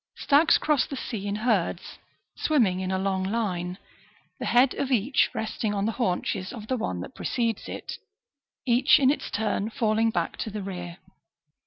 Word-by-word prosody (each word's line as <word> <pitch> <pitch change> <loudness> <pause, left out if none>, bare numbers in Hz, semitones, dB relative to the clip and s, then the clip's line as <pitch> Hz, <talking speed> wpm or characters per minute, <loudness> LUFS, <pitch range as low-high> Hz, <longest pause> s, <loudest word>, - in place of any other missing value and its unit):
Stags 295 +3 +4
cross 300 -3 +1
the 275 - -5
sea 215 -6 -5
in 200 - -1
herds, 210 -6 -1 0.4
swimming 225 -12 +2
in 185 0 -3
a 190 - 0
long 190 0 0
line, 185 -4 -2 0.6
the - - -3
head 250 +2 +4
of 275 - -2
each 260 +2 +2
resting 220 -1 -2
on 200 0 0
the 225 - +1
haunches 190 -4 -1
of 220 -3 -8
the 255 - -1
one 90 - -3
that - - -8
precedes 230 -3 -2
it, - - -6 0.7
each 245 +1 +5
in 270 -1 +5
its 295 - -3
turn 215 0 -1
falling 225 0 +1
back 175 -6 -2
to - - -3
the 210 -1 -5
rear. 175 -3 -6
215 Hz, 175 wpm, -26 LUFS, 190-245 Hz, 0.7 s, each